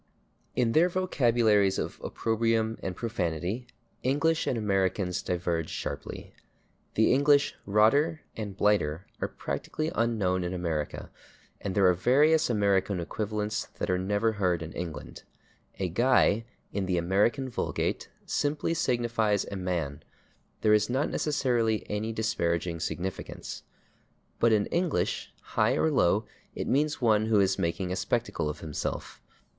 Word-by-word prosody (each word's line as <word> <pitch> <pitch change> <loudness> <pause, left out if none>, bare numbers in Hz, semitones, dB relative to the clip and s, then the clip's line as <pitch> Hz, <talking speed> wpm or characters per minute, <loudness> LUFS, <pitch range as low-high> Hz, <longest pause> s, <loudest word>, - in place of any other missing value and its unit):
In 120 -2 +2
their 165 +7 +4
vocabularies 115 - +2
of - - -4
opprobrium 115 0 0
and 95 -1 -4
profanity 95 +2 -2 0.3
English 150 +5 +1
and 125 - +1
Americans 95 -3 0
diverge 85 -2 -1
sharply. - - -6 0.6
The 110 - +4
English 140 +1 +4
/rotter/ 140 +11 +4 0.2
and 100 -3 -5
/blighter/ 95 -7 +2 0.2
are - - +1
practically 155 +1 -4
unknown 100 -6 +1
in 90 +1 -3
America, 80 -4 -3 0.5
and 95 -2 -4
there 100 - +4
are 90 - +6
various 145 - +4
American 100 -3 +2
equivalents 105 +4 -3
that - - -1
are 90 - +1
never 105 +4 +1
heard 90 -5 0
in 80 - -7
England. 80 -5 -6 0.6
A 95 - -1
/guy/, 115 0 +3 0.3
in 100 -2 -1
the 90 -1 +1
American 100 +9 +2
vulgate, 125 - -2 0.2
simply 150 +3 0
signifies 115 -8 +1
a - - -3
man; 85 -7 -2 0.6
there 105 - +4
is 105 +2 +3
not 130 +4 0
necessarily 120 -7 +1
any 105 +2 -1
disparaging 85 -6 -1
significance. 90 +3 -5 0.8
But 115 - +4
in 105 -2 +3
English, 175 -2 0
high - - +1
or 160 - +2
low, 105 -6 +3 0.3
it - - -3
means 145 +2 +1
one 110 -2 +3
who 110 -2 +4
is 95 -1 +2
making 90 +2 -1
a - - 0
spectacle 75 - -1
of 75 - -6
himself. 80 -2 -4
105 Hz, 135 wpm, -28 LUFS, 90-120 Hz, 0.8 s, are